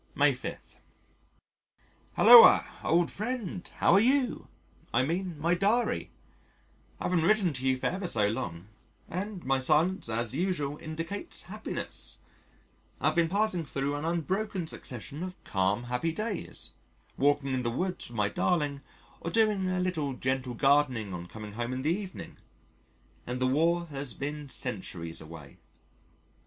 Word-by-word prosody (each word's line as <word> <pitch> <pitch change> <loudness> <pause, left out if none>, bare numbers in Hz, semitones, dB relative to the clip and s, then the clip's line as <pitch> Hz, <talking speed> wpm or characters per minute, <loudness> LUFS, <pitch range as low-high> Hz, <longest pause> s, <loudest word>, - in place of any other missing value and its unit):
May - - +4
5. - - -8 1.4
Hulloa, 475 0 +9 0.2
old 170 +1 +2
friend: 215 -5 -4
how - - +4
are 195 - +7
you? 255 +3 +2 0.4
I 120 - +3
mean 175 +2 -2
my 165 +3 +2
Diary. 205 +7 +1 0.9
I - - -6
haven't 180 -2 +2
written 190 -3 +3
to 130 0 0
you 130 0 +3
for - - -6
ever 185 0 -1
so 105 -9 +3
long, 85 -5 -4 0.4
and 190 +1 -5
my 135 0 +2
silence 155 - +2
as 115 +1 -1
usual 150 -3 -1
indicates 165 - -5
happiness. - - -6 0.8
I - - +3
have - - -4
been 170 -1 +3
passing 200 -2 +1
thro' 140 -1 -2
an 145 +1 -3
unbroken 180 +3 -1
succession 140 0 -6
of 185 0 -5
calm 95 +4 0
happy 125 +7 -1
days, 215 +2 -3 0.4
walking 140 -1 +2
in 130 - 0
the 120 - -1
woods 180 +8 -2
with 120 - -9
my 105 -1 +2
darling, 145 - 0 0.4
or 170 - -4
doing 210 -3 +2
a 185 0 0
little 165 -7 -1
gentle 130 -1 -2
gardening 135 -7 +2
on 85 0 -6
coming 105 +2 -9
home 120 +3 -3
in 130 0 -3
the 155 +3 +2
evening 195 -2 -8 0.9
and 125 +1 -3
the 130 - +1
War 165 +6 +2
has 135 -3 -4
been 145 0 -5
centuries 90 -11 -4
away. 80 -3 -11
150 Hz, 150 wpm, -29 LUFS, 125-185 Hz, 1.4 s, Hulloa